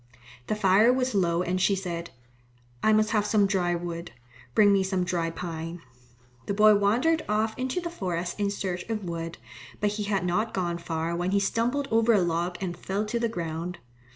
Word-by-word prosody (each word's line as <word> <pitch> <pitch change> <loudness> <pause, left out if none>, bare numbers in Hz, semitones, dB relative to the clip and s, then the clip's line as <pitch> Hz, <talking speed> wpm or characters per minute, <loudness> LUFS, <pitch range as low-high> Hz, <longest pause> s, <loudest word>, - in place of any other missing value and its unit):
The - - 0
fire 210 +3 +5
was 255 -1 0
low 175 -3 +2
and 185 +1 -1
she 200 +1 +3
said, 170 -3 -4 0.7
"I 220 - +4
must 215 0 +3
have 210 -2 +2
some 210 -1 +3
dry 180 -3 +1
wood. 170 0 -5 0.5
Bring 205 -1 +6
me 195 - +3
some 190 -1 0
dry 175 -2 -1
pine." 165 0 -5 0.7
The 200 - -1
boy 215 +1 +7
wandered 235 +11 +2
off 215 +1 +1
into 260 +6 -2
the 340 -1 -5
forest 180 - -3
in 200 -1 +1
search 190 -3 -3
of 215 -2 -2
wood, 165 -1 -5 0.4
but 205 0 +1
he 210 0 -3
had 195 -3 0
not 210 +6 0
gone 175 -2 -1
far 165 0 -2
when 175 +1 -1
he 200 +1 +2
stumbled 240 +7 0
over 225 +1 +4
a 210 - +5
log 175 +1 -1
and 180 -3 -3
fell 195 +4 -2
to 235 +3 -2
the 235 -1 0
ground. 170 -2 -4
195 Hz, 195 wpm, -27 LUFS, 175-215 Hz, 0.7 s, boy